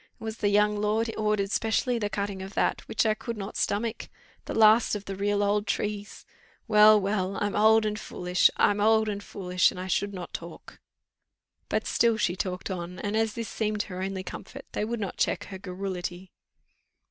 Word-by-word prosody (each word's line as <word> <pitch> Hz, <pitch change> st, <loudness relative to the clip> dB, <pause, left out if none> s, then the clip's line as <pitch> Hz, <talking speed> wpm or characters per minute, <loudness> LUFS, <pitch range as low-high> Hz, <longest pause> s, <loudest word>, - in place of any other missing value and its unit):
It -, -, -12 dB
was 220 Hz, 0 st, -4 dB
the 205 Hz, -, +1 dB
young 210 Hz, +1 st, +3 dB
lord 220 Hz, +2 st, 0 dB
ordered 210 Hz, -2 st, 0 dB
specially 230 Hz, +3 st, +1 dB
the 205 Hz, -2 st, -1 dB
cutting 200 Hz, -1 st, -3 dB
of 195 Hz, +1 st, -8 dB
that, -, -, +1 dB
which -, -, +1 dB
I 215 Hz, -, +3 dB
could 230 Hz, +1 st, -6 dB
not 200 Hz, 0 st, -6 dB
stomach; 220 Hz, +3 st, -2 dB, 0.4 s
the -, -, -5 dB
last 220 Hz, +1 st, +5 dB
of 205 Hz, -1 st, -6 dB
the 195 Hz, -, -5 dB
real 205 Hz, +1 st, 0 dB
old 205 Hz, +1 st, +1 dB
trees! 210 Hz, 0 st, -3 dB, 0.4 s
Well, 215 Hz, -1 st, +7 dB
well! 195 Hz, -1 st, -1 dB
I'm 205 Hz, -1 st, -1 dB
old 220 Hz, +1 st, +5 dB
and 210 Hz, 0 st, -2 dB
foolish 180 Hz, -3 st, +2 dB
I'm 205 Hz, 0 st, +3 dB
old 220 Hz, +1 st, +4 dB
and 205 Hz, -1 st, -3 dB
foolish, 185 Hz, -2 st, +1 dB
and 180 Hz, -, -8 dB
I 185 Hz, -, -4 dB
should 200 Hz, +2 st, 0 dB
not 180 Hz, -1 st, -7 dB
talk." -, -, -9 dB, 0.9 s
But -, -, 0 dB
still 230 Hz, -1 st, +2 dB
she 180 Hz, -5 st, 0 dB
talked 185 Hz, +1 st, -3 dB
on, 180 Hz, 0 st, -5 dB
and 205 Hz, +1 st, -3 dB
as 220 Hz, -1 st, +1 dB
this 230 Hz, -2 st, -4 dB
seemed 215 Hz, -2 st, -1 dB
her 185 Hz, -2 st, -7 dB
only 190 Hz, 0 st, -3 dB
comfort, -, -, -9 dB
they -, -, -2 dB
would 230 Hz, +2 st, -3 dB
not 200 Hz, -3 st, -4 dB
check 205 Hz, -, 0 dB
her 190 Hz, -2 st, -9 dB
garrulity. 185 Hz, -1 st, -5 dB
205 Hz, 195 wpm, -27 LUFS, 190-215 Hz, 0.9 s, Well